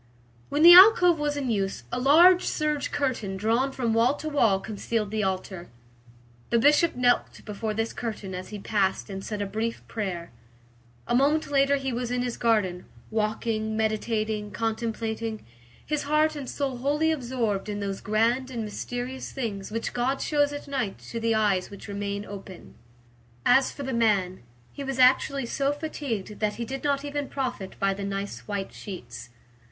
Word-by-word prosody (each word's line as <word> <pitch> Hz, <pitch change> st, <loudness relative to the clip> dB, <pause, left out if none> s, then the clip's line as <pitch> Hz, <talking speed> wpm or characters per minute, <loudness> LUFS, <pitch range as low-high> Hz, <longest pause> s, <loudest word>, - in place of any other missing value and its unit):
When 295 Hz, +2 st, +1 dB
the 345 Hz, +1 st, +11 dB
alcove 360 Hz, -3 st, +8 dB
was 295 Hz, -1 st, -1 dB
in 265 Hz, -4 st, -1 dB
use, 195 Hz, -3 st, -2 dB
a 245 Hz, -, -1 dB
large 340 Hz, +8 st, +7 dB
serge 300 Hz, -2 st, -1 dB
curtain 240 Hz, -9 st, -2 dB
drawn 230 Hz, +7 st, +1 dB
from 240 Hz, -4 st, -1 dB
wall 235 Hz, +5 st, +3 dB
to 310 Hz, -, -5 dB
wall 230 Hz, -10 st, +3 dB
concealed 210 Hz, +1 st, -3 dB
the 215 Hz, 0 st, -1 dB
altar. 190 Hz, -2 st, -3 dB, 0.8 s
The 235 Hz, -, +3 dB
Bishop 295 Hz, +7 st, +4 dB
knelt 245 Hz, 0 st, +1 dB
before 215 Hz, 0 st, -4 dB
this 225 Hz, +1 st, -2 dB
curtain 215 Hz, -5 st, -5 dB
as 185 Hz, 0 st, -6 dB
he 210 Hz, -, -6 dB
passed 200 Hz, -1 st, -1 dB
and 195 Hz, 0 st, -6 dB
said 210 Hz, -2 st, -3 dB
a -, -, -2 dB
brief 220 Hz, +4 st, -4 dB
prayer. 185 Hz, -6 st, -4 dB, 0.7 s
A -, -, -2 dB
moment 285 Hz, +4 st, +2 dB
later 275 Hz, 0 st, +4 dB
he 270 Hz, -2 st, -3 dB
was 240 Hz, 0 st, -2 dB
in 250 Hz, 0 st, -1 dB
his 245 Hz, -1 st, -3 dB
garden, 205 Hz, -6 st, +1 dB, 0.3 s
walking, 220 Hz, 0 st, -1 dB
meditating, 215 Hz, -1 st, -1 dB
contemplating, 225 Hz, 0 st, -3 dB, 0.4 s
his 300 Hz, 0 st, -1 dB
heart 305 Hz, +2 st, +2 dB
and 280 Hz, -4 st, -6 dB
soul 270 Hz, -3 st, -2 dB
wholly 295 Hz, +5 st, +1 dB
absorbed 240 Hz, -8 st, -2 dB
in 205 Hz, 0 st, -3 dB
those 195 Hz, -1 st, -4 dB
grand 230 Hz, +4 st, +1 dB
and 235 Hz, -3 st, -4 dB
mysterious 245 Hz, +4 st, -5 dB
things 210 Hz, -7 st, -4 dB
which 230 Hz, +1 st, -3 dB
God 255 Hz, +3 st, 0 dB
shows 290 Hz, -1 st, +1 dB
at 290 Hz, 0 st, -7 dB
night 255 Hz, -8 st, -2 dB
to 230 Hz, -, -3 dB
the 225 Hz, 0 st, +1 dB
eyes 200 Hz, -4 st, +1 dB
which 200 Hz, +1 st, -11 dB
remain 200 Hz, 0 st, -4 dB
open. 195 Hz, -2 st, -10 dB, 0.7 s
As 265 Hz, 0 st, +4 dB
for 285 Hz, -, -7 dB
the 265 Hz, -1 st, -3 dB
man, 200 Hz, -6 st, +1 dB, 0.3 s
he 280 Hz, -, -6 dB
was 270 Hz, -1 st, -3 dB
actually 260 Hz, +1 st, +4 dB
so 275 Hz, +4 st, 0 dB
fatigued 280 Hz, -9 st, -5 dB
that 210 Hz, -1 st, 0 dB
he 235 Hz, -, -4 dB
did 270 Hz, +3 st, -6 dB
not 285 Hz, -1 st, 0 dB
even 290 Hz, -1 st, -3 dB
profit 250 Hz, -8 st, -4 dB
by 195 Hz, 0 st, +2 dB
the 200 Hz, +1 st, -6 dB
nice 200 Hz, 0 st, -5 dB
white 200 Hz, -2 st, -4 dB
sheets. 120 Hz, -, -9 dB
230 Hz, 175 wpm, -26 LUFS, 205-275 Hz, 0.8 s, the